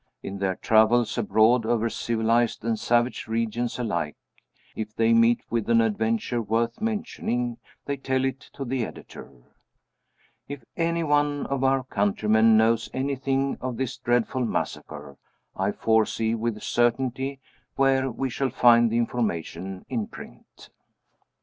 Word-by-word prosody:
In 100 0 -6
their 95 -1 0
travels 110 +3 +3
abroad, 110 +3 +3
over 115 0 +1
civilized 115 0 0
and 115 -2 0
savage 120 +2 0
regions 115 +1 -2
alike, 85 -11 -2 0.6
if 110 -1 -5
they 115 0 +3
meet 115 +1 +4
with 115 -1 -1
an 115 0 +5
adventure 115 +2 0
worth 115 - -1
mentioning 125 - -2 0.3
they 140 0 -2
tell 130 0 -1
it 135 0 -2
to 135 - -5
the 130 -1 -1
Editor. - - -9 1.2
If 140 -3 -7
any 170 0 0
one 145 -1 +1
of 140 -1 -2
our 135 0 +2
countrymen 110 0 +3
knows 115 +1 +2
anything 135 0 -1
of 130 -2 -4
this 130 -2 -2
dreadful 120 +1 0
massacre, 70 - -4 0.4
I 95 +2 0
foresee 110 +1 +1
with 115 -1 -3
certainty 130 +3 0 0.4
where 135 -1 +2
we 130 +2 -3
shall 135 +2 -1
find 120 -1 +5
the 115 - 0
information 95 -6 -3
in 115 -5 -2
print. - - -13
115 Hz, 135 wpm, -25 LUFS, 110-130 Hz, 1.2 s, an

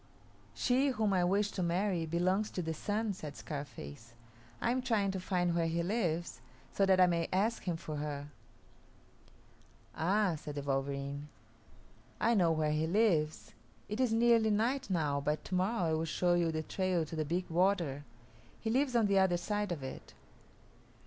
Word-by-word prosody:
"She 260 +2 +2
whom 220 -6 +1
I 180 -2 +3
wish 200 +3 +1
to 185 - -3
marry 175 -1 0
belongs 185 +6 +1
to 180 - -2
the 160 0 -2
Sun," 210 +6 -1
said 150 -6 -8
Scarface; 115 - -8 0.4
"I 235 - +1
am 255 +1 0
trying 215 -6 +1
to 190 - -3
find 180 -2 0
where 170 -1 +1
he 170 +1 -1
lives, 175 -4 -1 0.3
so 195 - +2
that 190 -1 +4
I 185 - +8
may 170 -2 0
ask 210 +5 +1
him 175 -3 -1
for 155 -2 -6
her." 145 -1 -4 1.7
"Ah," 190 0 +1
said 145 0 -7
the 145 - -4
wolverene, 140 +1 -2 0.9
"I 235 - +3
know 180 -6 +4
where 155 -1 +1
he 155 +1 0
lives. 170 -6 +1 0.3
It 210 +3 -4
is 255 -3 +2
nearly 230 -1 +4
night 240 +5 0
now, 150 -6 0
but 150 +2 -2
to - - -7
morrow 185 -2 +1
I - - +1
will 160 +1 0
show 175 +2 +1
you 170 -1 +2
the 155 0 -2
trail 185 0 0
to 160 - -7
the 155 - 0
big 175 +5 -2
water. 170 -5 +1 0.6
He 220 - -2
lives 260 +1 +1
on 230 -2 +4
the 200 -1 +3
other 185 -2 +3
side 205 +2 -2
of 155 -6 -4
it." 130 - -8
175 Hz, 180 wpm, -33 LUFS, 155-205 Hz, 1.7 s, I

